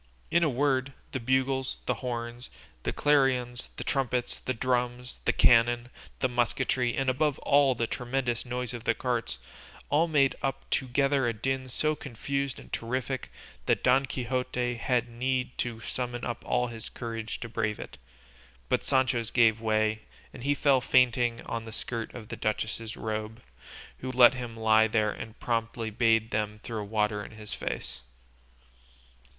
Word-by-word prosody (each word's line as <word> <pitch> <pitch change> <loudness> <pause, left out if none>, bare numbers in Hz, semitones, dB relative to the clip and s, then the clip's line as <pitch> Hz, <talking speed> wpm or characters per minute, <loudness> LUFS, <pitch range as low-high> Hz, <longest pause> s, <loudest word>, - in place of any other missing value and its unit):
In 170 0 +4
a 155 - +3
word, 135 0 +1 0.2
the 130 - -2
bugles, 130 +2 +1
the - - +2
horns, 120 -1 -4 0.3
the - - -1
clarions, 130 -4 +2
the - - -5
trumpets, 125 -2 -1
the 130 - -2
drums, 125 0 -1
the - - +4
cannon, 120 +1 +4 0.3
the 130 - +4
musketry, 125 0 +1
and 135 - 0
above 140 +2 +2
all 140 -2 +4
the 115 - 0
tremendous 120 0 -2
noise 125 0 -3
of 120 -2 -7
the 115 - +2
carts, 120 - -2 0.5
all 160 +4 +3
made 140 -4 +3
up 135 -1 -2
together 135 +1 +2
a 115 - +1
din 130 +4 -2
so 155 +5 +1
confused 140 0 -3
and - - -13
terrific 130 +2 -2 0.4
that - - +2
Don 130 +2 +4
Quixote 125 -1 -1
had 120 0 +1
need 125 +1 -1
to 120 -2 -2
summon 120 +1 -3
up 120 - -3
all 125 0 +2
his 115 -2 -7
courage 115 -2 -5
to 115 - -4
brave 105 -2 -1
it; - - -9 0.7
but - - +2
Sancho's 130 -4 +2
gave 115 -2 +4
way, 110 -1 +1 0.3
and - - -9
he 145 +1 +2
fell 135 -2 +4
fainting 120 -2 +3
on 115 -1 -4
the 110 - -8
skirt 115 +1 -4
of 115 -3 -9
the - - -4
duchess's 110 +1 -2
robe, 110 +1 -4 0.6
who 130 - -4
let 125 -1 +7
him 120 -3 -6
lie 110 0 +5
there 110 -1 +2
and 110 +2 -8
promptly 115 -1 -1
bade 115 0 +3
them 105 0 -1
throw 110 -3 -4
water 105 0 0
in - - -10
his 105 -1 -9
face. - - -4
120 Hz, 160 wpm, -29 LUFS, 115-130 Hz, 0.7 s, let